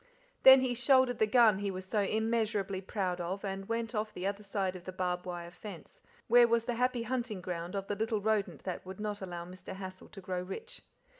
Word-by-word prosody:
Then 265 0 +10
he 255 -1 +1
shouldered 260 0 +3
the 220 - +4
gun 220 -3 +5
he 200 0 -1
was 185 0 -5
so 210 +3 0
immeasurably 215 -2 0
proud 185 -2 -2
of 190 +4 -3
and 195 +1 -4
went 230 0 -2
off 215 -1 -1
the 180 - -6
other 200 +1 -2
side 195 -2 -2
of 180 -1 -10
the 185 - -5
barbed 180 -1 -2
wire 175 -1 -5
fence, 180 0 -10 0.3
where 240 +1 +7
was 235 -1 +2
the 245 - -1
happy 250 0 0
hunting 240 -4 -2
ground 180 0 -5
of 195 -1 -2
the 205 - -2
little 220 +1 0
rodent 210 -1 0
that 185 -2 -4
would 190 +1 -9
not 210 -1 -3
allow 175 -2 -5
Mr. 185 +1 -9
Hassal 190 -1 -8
to 205 - -11
grow 185 -1 -3
rich. 185 +1 -7
200 Hz, 220 wpm, -32 LUFS, 185-225 Hz, 0.3 s, Then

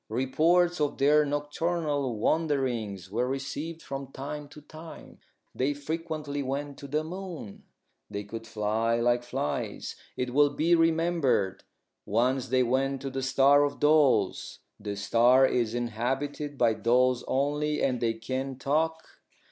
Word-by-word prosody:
Reports 160 +8 +2
of 145 - 0
their 150 +2 +4
nocturnal 145 -2 -1
wanderings 120 - -1
were 120 +4 0
received 140 +5 -4
from 135 -1 -6
time 145 +2 -6
to 150 - -12
time. 155 +2 -12 0.3
They 140 +3 0
frequently 150 -1 -4
went 140 +1 -4
to 140 - -8
the 150 +3 -1
moon. 175 - -8 0.4
They 100 0 -4
could 115 +2 -8
fly 110 +2 0
like 120 +1 +2
flies, 75 -11 -4 0.2
it 125 -1 -2
will 145 +1 +5
be 155 +4 +1
remembered. 165 - +2 0.4
Once 125 +4 +1
they 130 +1 +2
went 135 +2 0
to 135 - -4
the 135 0 -3
Star 135 +2 +4
of 145 0 -2
Dolls. 145 -10 +2 0.2
This 100 -1 -5
star 125 +5 +5
is 120 -3 0
inhabited 135 +5 -3
by 115 -3 +3
dolls 125 +2 +2
only, 150 +2 0
and 125 -3 0
they 115 -1 +1
can 130 +3 -4
talk. 160 +4 0
135 Hz, 140 wpm, -28 LUFS, 120-150 Hz, 0.4 s, will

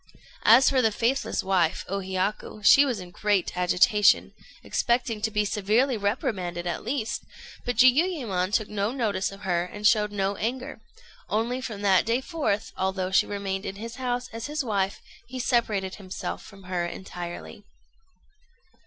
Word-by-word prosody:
As 235 +5 +7
for 265 -2 +4
the 220 -2 +3
faithless 240 +6 0
wife, 180 -4 +1
O 195 +1 -2
Hiyaku, 190 +3 -3
she 280 +6 +7
was 250 -6 -2
in 180 -1 -9
great 205 -1 0
agitation, 190 +4 +3 0.3
expecting 235 -2 0
to 220 - +1
be 210 -1 0
severely 215 +6 +1
reprimanded 195 -5 -2
at 175 - -3
least; 230 -1 -2 0.4
but 245 - -1
Jiuyémon 250 - +3
took 215 0 +1
no 205 +1 -1
notice 210 -8 -1
of 195 - -12
her, 175 -3 0
and 210 +4 -7
showed 210 -1 +4
no 200 -1 -1
anger; 255 +5 -4 0.5
only 235 +4 -1
from 215 -5 -6
that 195 -2 +4
day 230 +2 +2
forth, 265 - -2
although 190 0 -1
she 190 - +4
remained 200 -1 -3
in 195 - -5
his 230 +3 -8
house 250 -1 -2
as 230 +2 -5
his 300 -1 -2
wife, 200 -3 -1 0.3
he 255 - -7
separated 220 -7 0
himself 185 -3 -6
from 195 -2 -14
her 180 -1 -2
entirely. 175 +2 -7
210 Hz, 160 wpm, -26 LUFS, 190-240 Hz, 0.5 s, As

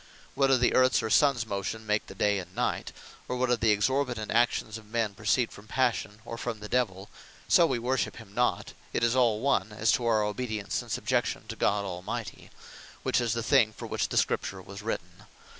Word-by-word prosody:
Whether 135 -1 +3
the 125 0 +2
Earths, 130 -2 +4
or 110 - -2
Suns 135 -6 +4
motion 105 +2 -4
make 105 0 0
the 95 - -10
day, 100 +1 +2
and 90 - -10
night; - - -1 0.4
or 125 - -2
whether 125 -1 +2
the 115 -1 +1
Exorbitant 120 +1 +1
actions 115 -1 +1
of 110 - -18
men, 110 -2 -1
proceed 110 +3 +1
from 105 +1 -13
Passion, 115 -4 -1
or 115 0 -6
from 120 -3 -4
the 105 - -7
Divell, 105 -5 -1 0.4
(so 170 - +6
we 130 - 0
worship 120 -2 -1
him 100 - -12
not) 125 -5 0 0.2
it - - 0
is 115 +1 +3
all 115 -4 +3
one, 110 -7 +1
as 110 +1 +2
to 120 - +1
our 110 -2 +3
obedience, 105 -1 -2
and - - -10
subjection - - -1
to - - -4
God 100 0 +1
Almighty; 90 -1 -6 0.5
which - - +2
is 115 -2 0
the 115 -1 -2
thing 110 -2 +4
for - - -8
which - - -1
the - - -2
Scripture 95 - 0
was 100 +2 -10
written. 115 +2 -5
110 Hz, 205 wpm, -28 LUFS, 105-125 Hz, 0.5 s, so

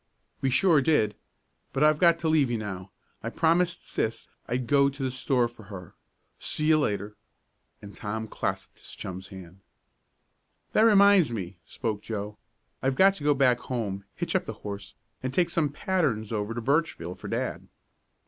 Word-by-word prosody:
"We 135 - +2
sure 160 +2 +4
did. 130 -8 +2 0.6
But 135 - +1
I've 155 0 +4
got 170 -2 +5
to 165 - -2
leave 155 -5 +3
you 120 - 0
now. 95 -3 -6 0.3
I 115 - -3
promised 170 +5 +1
Sis 115 0 -2 0.2
I'd 125 +1 -1
go 140 +3 +4
to 140 0 -6
the 130 - 0
store 125 -1 +1
for 115 -3 -15
her. 95 -4 -10 0.5
See 150 - -1
you 155 -1 +5
later," 105 -5 -2 0.7
and 100 0 -10
Tom 110 +1 -4
clasped - - -4
his - - -11
chum's 95 +1 -7
hand. 95 -1 -12 1.1
"That 220 - +5
reminds 200 - +6
me," 95 -5 -5
spoke 110 -4 -3
Joe. 105 -1 -5 0.4
"I've 130 0 +1
got 195 +6 +6
to 145 - -9
go 145 0 +3
back 130 -3 +3
home, 100 -7 -4
hitch - - -3
up - - +1
the - - -5
horse, 100 -1 -6 0.3
and 130 - -2
take 170 +4 +1
some 160 -4 +1
patterns 145 - -1
over 105 +1 -2
to 120 - -3
Birchville 140 - 0
for - - -10
dad." - - -3
125 Hz, 175 wpm, -27 LUFS, 105-155 Hz, 1.1 s, reminds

